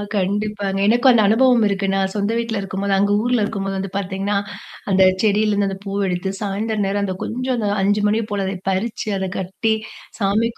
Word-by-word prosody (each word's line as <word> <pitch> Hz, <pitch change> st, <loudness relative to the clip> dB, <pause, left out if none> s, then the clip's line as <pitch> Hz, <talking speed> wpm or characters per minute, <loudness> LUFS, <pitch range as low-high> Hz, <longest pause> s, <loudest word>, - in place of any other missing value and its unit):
கண்டிப்பாங்க. 200 Hz, 0 st, -1 dB
எனக்கும் 240 Hz, +4 st, +5 dB
அந்த 230 Hz, -3 st, +4 dB
அனுபவம் 240 Hz, +2 st, +4 dB
இருக்கு, 195 Hz, 0 st, -1 dB
நான் 195 Hz, 0 st, 0 dB
சொந்த 205 Hz, +1 st, 0 dB
வீட்ல 230 Hz, -2 st, -2 dB
இருக்கும்போது 195 Hz, +1 st, -2 dB
அங்க 200 Hz, +1 st, +2 dB
ஊர்ல 245 Hz, -2 st, +1 dB
இருக்கும்போது 195 Hz, -2 st, -3 dB
வந்து 190 Hz, 0 st, -3 dB
பாத்தீங்கன்னா, 195 Hz, +1 st, -2 dB, 0.6 s
அந்த 190 Hz, 0 st, +4 dB, 0.2 s
செடியிலேருந்து 205 Hz, -1 st, +2 dB
அந்த 195 Hz, -, -5 dB
பூவ 200 Hz, +1 st, -3 dB
எடுத்து, 180 Hz, +1 st, -2 dB
சாயந்திரம் 210 Hz, +1 st, -1 dB
நேரம் 200 Hz, +1 st, -1 dB
அந்த 185 Hz, -1 st, -3 dB
கொஞ்சம் 255 Hz, +2 st, -2 dB
அந்த 210 Hz, -3 st, -1 dB
5:00 205 Hz, +1 st, +2 dB
மணிய 220 Hz, +2 st, +1 dB
போல 200 Hz, -1 st, -1 dB
அதை 190 Hz, -, -3 dB
பறிச்சு, 220 Hz, +5 st, -2 dB
அத 190 Hz, 0 st, -2 dB
கட்டி, 190 Hz, +4 st, -1 dB, 0.5 s
சாமிக்கு 220 Hz, +3 st, +1 dB
205 Hz, 180 wpm, -20 LUFS, 195-220 Hz, 0.6 s, எனக்கும்